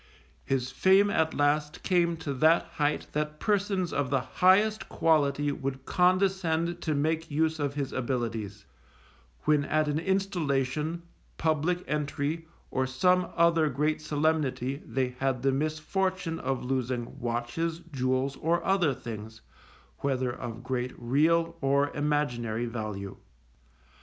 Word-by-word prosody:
His 130 -1 -1
fame 195 +6 +4
at 160 -3 +1
last 150 +1 +1
came 170 -3 +2
to 150 -3 -4
that 160 +5 +4 0.2
height 145 0 +1
that 150 0 -2
persons 200 -4 0
of 140 -2 0
the 135 -1 +1
highest 205 - +3
quality 145 -2 +2
would 135 -1 -4
condescend 180 -2 +1
to 155 -3 -1
make 160 +3 0
use 160 +1 0
of 145 -1 -1
his 140 -2 -3
abilities, 115 -5 -3 0.8
when 150 -2 +3
at 155 +1 +1
an 150 +1 0
installation, 165 -4 -1 0.3
public 160 +3 0
entry, 150 +2 -2 0.2
or 130 0 0
some 180 +8 +2
other 165 -2 +4
great 150 +4 0
solemnity 145 -4 0
they 130 +2 0
had 130 -2 0
the 135 - +3
misfortune 165 +4 -1
of 135 -2 -2
losing 125 -2 -2
watches, 120 +8 -2
jewels, 130 +1 0
or 170 +2 0
other 180 -8 +2
things, 110 -1 -8 0.6
whether 130 -2 0
of 120 0 -7
great 125 -1 -2
real 165 +7 +2
or 140 +1 +2
imaginary 125 -6 0
value. 110 -4 -5
150 Hz, 125 wpm, -28 LUFS, 130-165 Hz, 0.8 s, fame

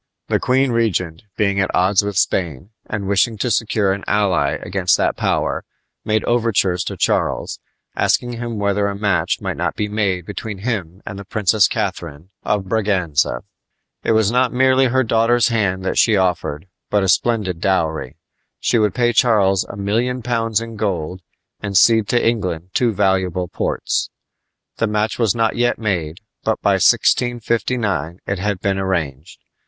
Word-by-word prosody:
The - - +2
queen 130 +1 +2
regent, 95 -8 -1 0.2
being 100 -2 +1
at 95 - +1
odds 95 +2 +3
with 100 -2 -3
Spain, 85 - -1 0.2
and 105 -2 -4
wishing 100 +3 +1
to 120 +4 -1
secure 105 -3 +1
an 100 - -6
ally 100 -4 +1
against 95 -1 +1
that - - +1
power, - - -1 0.4
made 110 0 0
overtures 110 -7 +1
to - - -5
Charles, - - 0 0.4
asking 120 0 +1
him 120 -1 -5
whether 100 0 0
a 100 - -3
match 100 -2 0
might - - -3
not - - -2
be 105 - -2
made 100 -4 -1
between 105 +1 -6
him 95 -4 -4
and 100 -1 -7
the - - -7
Princess 105 0 +2
Catharine 80 +3 -4
of 105 -2 -1
Braganza. 90 - 0 0.6
It - - +2
was 110 -1 +3
not 125 0 +2
merely 130 +1 +3
her 130 +2 +2
daughter's 115 +1 +2
hand 95 -5 0
that - - 0
she 110 -3 +4
offered, 90 -4 -1 0.2
but 105 -1 +2
a - - 0
splendid 95 -2 +1
dowry. 80 -8 -1 0.4
She 120 - +1
would 105 -3 +1
pay 120 -1 +2
Charles 100 -5 +3
a - - -9
million 115 +5 -1
pounds 115 -2 0
in 115 -1 -8
gold 90 -3 -3 0.4
and 100 -2 -1
cede 110 0 +5
to 120 - +2
England 90 -6 -2
two 120 -2 +2
valuable 95 -3 0
ports. - - -2 0.7
The 115 - +1
match 105 +2 -1
was 115 -4 +2
not 115 -1 +1
yet 120 0 +1
made, 90 -5 -3 0.2
but - - 0
by - - +3
1659 115 -7 +1
it 100 -1 -2
had 100 -1 -1
been 95 -1 0
arranged. 80 -6 -3
100 Hz, 165 wpm, -19 LUFS, 95-115 Hz, 0.7 s, cede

